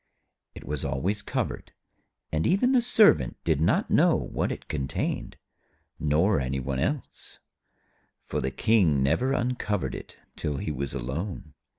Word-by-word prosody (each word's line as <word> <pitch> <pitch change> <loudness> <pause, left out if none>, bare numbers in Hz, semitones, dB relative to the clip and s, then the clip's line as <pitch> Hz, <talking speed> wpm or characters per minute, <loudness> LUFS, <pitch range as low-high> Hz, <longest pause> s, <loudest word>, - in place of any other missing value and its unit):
It - - -9
was 75 -1 -3
always 105 +3 -1
covered, - - -4 0.6
and 80 0 +1
even 225 +8 +3
the 255 -2 +4
Servant 215 - +4
did 80 -3 +1
not 80 - +2
know - - +5
what - - -2
it - - -7
contained, 70 -2 -3 0.6
nor 80 +5 +2
any 65 0 -2
one 65 0 -3
else, 145 - -3 0.9
for - - -2
the 65 - -1
King 85 - +3
never 125 - +2
uncovered 120 -6 -1
it - - -9 0.2
till 75 -2 -3
he 75 - -3
was 70 -1 -4
alone. 75 +5 -5
80 Hz, 145 wpm, -27 LUFS, 70-110 Hz, 0.9 s, know